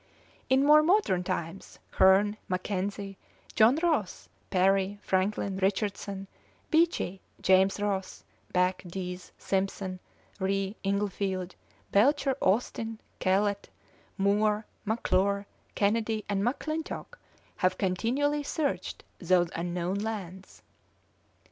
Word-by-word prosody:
In 265 +1 +4
more 300 +1 +8
modern 320 - +2
times, 170 +1 -5 0.2
Hearne, 200 +3 +5
Mackenzie, 195 +1 -3 0.3
John 230 +3 +5
Ross, 215 - 0 0.2
Parry, 195 +2 +2
Franklin, 190 0 0
Richardson, 195 0 -1 0.5
Beechey, 315 - +2 0.2
James 190 +1 +4
Ross, 195 -2 -2 0.3
Back, 180 +1 +1
Dease, 180 0 -6
Simpson, 190 -1 -2 0.4
Rae, 195 +1 -1
Inglefield, 195 -2 -1 0.4
Belcher, 270 +5 +3
Austin, 225 +2 0 0.2
Kellett, 200 +2 +1 0.5
Moore, 210 +2 +2 0.2
McClure, 200 -2 +1 0.3
Kennedy, 215 +1 +1
and 200 -1 0
McClintock 310 - -3 0.4
have 185 0 +1
continually 250 +10 0
searched 290 0 -2 0.2
those 175 -1 +3
unknown 175 +2 -2
lands. 195 -4 -6
200 Hz, 90 wpm, -29 LUFS, 185-220 Hz, 0.5 s, more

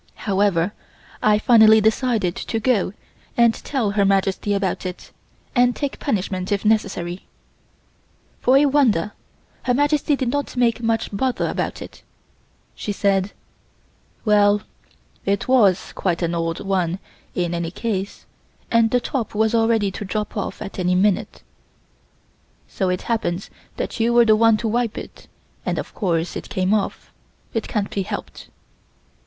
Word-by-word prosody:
However, 200 -2 +1 0.5
I 210 -1 +4
finally 220 -1 +6
decided 220 -4 +1
to 225 - -3
go 220 -5 +1 0.4
and 235 -1 +5
tell 240 -6 -2
Her 205 0 +2
Majesty 195 +1 +1
about 195 -2 -1
it, 185 -1 -7 0.4
and 245 0 +4
take 285 -2 -3
punishment 190 -6 -2
if 200 +1 0
necessary. 195 -5 0 1.1
For 255 +2 +4
a 290 - +5
wonder 250 - +2 0.5
Her 250 - +1
Majesty 290 +1 +2
did 260 -3 -1
not 285 0 -3
make 235 -1 +2
much 225 -2 -1
bother 255 +4 0
about - - -3
it. - - -13 0.7
She 210 - -4
said: 195 -1 +1 0.9
"Well 205 -1 +4 0.6
it 200 0 -1
was 210 -8 +3
quite 175 -2 -1
an 170 0 0
old 165 -1 -2
one 185 -3 0 0.4
in 175 -1 -1
any 170 -1 -2
case 200 0 -4 0.5
and 230 -1 +4
the 245 - +2
top 240 -3 -3
was 220 +1 +2
ready 225 -3 +2
to 200 - -6
drop 210 +2 -3
off 205 - -4
at 195 -1 -8
any 180 0 +1
time; 200 0 +4
it - - -10 1.2
so 190 -2 -1
happens 180 -1 -2 0.3
that - - -4
you 230 +1 +2
were 240 0 +6
the 215 -1 +5
one 225 0 +4
to 225 - -2
wipe 230 0 -1
it, - - -9 0.4
and - - -2
of - - -5
course 170 -4 -1
it - - -6
came 185 +2 0
off. 210 -2 -2 0.4
It 225 - -2
can't 205 -2 -2
be 200 - -1
helped." 190 - -6
210 Hz, 150 wpm, -21 LUFS, 190-230 Hz, 1.2 s, finally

